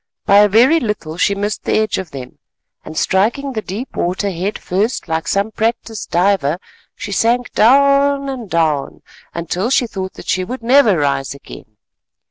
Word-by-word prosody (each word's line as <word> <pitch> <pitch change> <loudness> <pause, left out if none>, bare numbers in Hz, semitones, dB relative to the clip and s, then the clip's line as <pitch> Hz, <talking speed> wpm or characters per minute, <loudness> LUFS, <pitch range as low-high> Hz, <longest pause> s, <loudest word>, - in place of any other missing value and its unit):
By 200 - +5
a 205 0 +6
very 250 +11 +5
little 210 - -4
she 200 +2 +2
missed 205 +1 -3
the - - +1
edge 215 -2 0
of 190 -3 -6
them 130 -4 -10 0.4
and 155 - -9
striking 235 +9 0
the 220 - -3
deep 215 +7 -7
water 190 +3 -1
head 185 +4 -3
first 205 +6 -2
like 160 -2 -2
some 200 +6 0
practised 225 -1 -3
diver, 175 -4 +1 0.4
she 205 - -7
sank 240 +4 +1
down 280 +3 +4
and 250 -6 -6
down 155 -5 -1 0.5
till 190 +7 -1
she 260 -1 +2
thought 190 -4 -6
that - - -12
she 185 - 0
would 245 +5 -6
never 240 -5 +4
rise 140 -2 -1
again. 110 -5 -13
205 Hz, 170 wpm, -17 LUFS, 180-240 Hz, 0.5 s, a